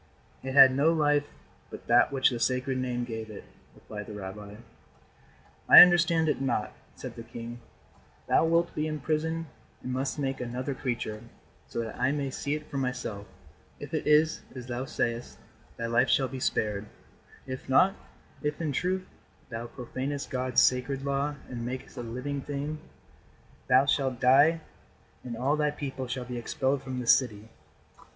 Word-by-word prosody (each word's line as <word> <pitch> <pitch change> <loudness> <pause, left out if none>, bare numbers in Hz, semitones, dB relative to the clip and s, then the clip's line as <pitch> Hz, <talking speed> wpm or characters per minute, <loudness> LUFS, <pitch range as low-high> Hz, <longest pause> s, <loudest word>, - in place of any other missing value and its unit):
"It 130 0 -5
had 135 -2 +9
no 145 +4 +4
life 145 -2 +2 0.4
but - - -10
that 120 +3 +4
which 135 -1 +3
the 120 - -3
Sacred 130 +1 0
Name 125 -1 -2
gave 110 -2 -6
it," 105 - -9 0.3
replied 105 -1 -9
the 105 - -8
rabbi. 100 +1 -8 1.1
"I - - +13
understand 170 -2 +3
it 150 - 0
not," 120 -5 -1 0.2
said - - -8
the - - -8
king. 115 +1 -8 0.7
"Thou - - +4
wilt 170 +1 +2
be 155 +1 -1
imprisoned 155 +2 -2 0.4
and 125 - -3
must 135 +3 -2
make 135 -2 -2
another 125 +3 -3
creature, 120 -5 -4 0.5
so - - -3
that 115 0 -7
I 130 +2 +2
may 140 -2 -2
see 145 +3 -2
it 150 0 -7
for 140 - -5
myself. 120 -6 -4 0.5
If - - -9
it - - -2
is 155 +1 +4
as 125 -1 -7
thou 125 +1 -4
sayest, 115 -2 -3 0.4
thy 115 - -3
life 120 +2 +2
shall 135 - +3
be 130 +1 -7
spared. 105 -3 -1 0.6
If 130 0 -7
not 185 +9 +5 0.5
if, 150 0 -2
in 160 -3 -1
truth, 185 +6 -1 0.4
thou 115 0 -5
profanest 130 +4 -5
God's 130 -1 +2
sacred 130 +2 +1
law 140 +1 -1
and 120 -2 -6
makest 125 +2 -6
a 125 - -5
living 125 +4 -4
thing, 145 +2 -4 0.9
thou 130 +2 +5
shalt 135 -3 0
die 145 +6 +5 0.6
and 120 -2 -6
all 135 +5 +1
thy 150 -1 +1
people 135 -3 -5
shall 125 0 -4
be 125 -1 -5
expelled 130 +3 -1
from 130 -1 -5
this 120 - +6
city." 110 -4 -4
130 Hz, 165 wpm, -28 LUFS, 120-145 Hz, 1.1 s, I